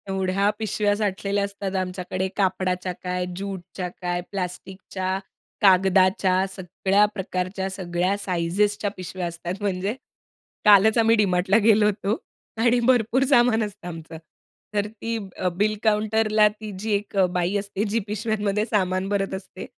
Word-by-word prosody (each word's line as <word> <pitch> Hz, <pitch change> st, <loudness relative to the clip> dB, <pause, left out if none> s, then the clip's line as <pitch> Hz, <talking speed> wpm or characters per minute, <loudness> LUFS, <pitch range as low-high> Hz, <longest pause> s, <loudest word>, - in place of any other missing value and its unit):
एवढ्या 190 Hz, +1 st, +1 dB
पिशव्या 210 Hz, -1 st, 0 dB
साठलेल्या 200 Hz, -1 st, -1 dB
असतात 200 Hz, -1 st, -4 dB
आमच्याकडे, 185 Hz, 0 st, -2 dB
कापडाच्या 185 Hz, -1 st, 0 dB
काय, 180 Hz, 0 st, -2 dB
ज्यूटच्या 190 Hz, -1 st, -5 dB
काय, 175 Hz, 0 st, -1 dB
प्लास्टिकच्या, 190 Hz, 0 st, -4 dB, 0.4 s
कागदाच्या. 190 Hz, -1 st, +4 dB
सगळ्या 190 Hz, +2 st, +2 dB
प्रकारच्या, 190 Hz, 0 st, -3 dB
सगळ्या 185 Hz, 0 st, -1 dB
साइझेच्या 200 Hz, +3 st, 0 dB
पिशव्या 185 Hz, 0 st, -4 dB
असतात. 170 Hz, +3 st, -6 dB
म्हणजे, 195 Hz, 0 st, -1 dB, 0.7 s
कालच 210 Hz, +2 st, +6 dB
आम्ही 225 Hz, 0 st, +5 dB
डी-मार्टला 195 Hz, -1 st, +3 dB
गेलो 215 Hz, -1 st, +5 dB
होतो. 210 Hz, +1 st, 0 dB, 0.4 s
आणि 235 Hz, +2 st, +3 dB
भरपूर 250 Hz, +1 st, +3 dB
सामान 240 Hz, -4 st, +4 dB
असतं 205 Hz, -3 st, -7 dB
आमचं, 165 Hz, -1 st, -8 dB, 0.6 s
तर 205 Hz, 0 st, 0 dB
ती 225 Hz, +2 st, -4 dB, 0.2 s
अ, 185 Hz, -, -1 dB
बिल 215 Hz, +2 st, +2 dB
काउंटरला 215 Hz, 0 st, +3 dB
ती 215 Hz, 0 st, -9 dB
जी 215 Hz, +2 st, -3 dB
एक 205 Hz, 0 st, -2 dB
अ, 190 Hz, -, +5 dB
बाई 180 Hz, +2 st, 0 dB
असते, 200 Hz, 0 st, -3 dB
जी 225 Hz, +3 st, +1 dB
पिशव्यांमध्ये 210 Hz, 0 st, -1 dB
सामान 185 Hz, -4 st, 0 dB
भरत 195 Hz, -1 st, -1 dB
असते. 190 Hz, -1 st, -7 dB
195 Hz, 135 wpm, -24 LUFS, 185-210 Hz, 0.7 s, कालच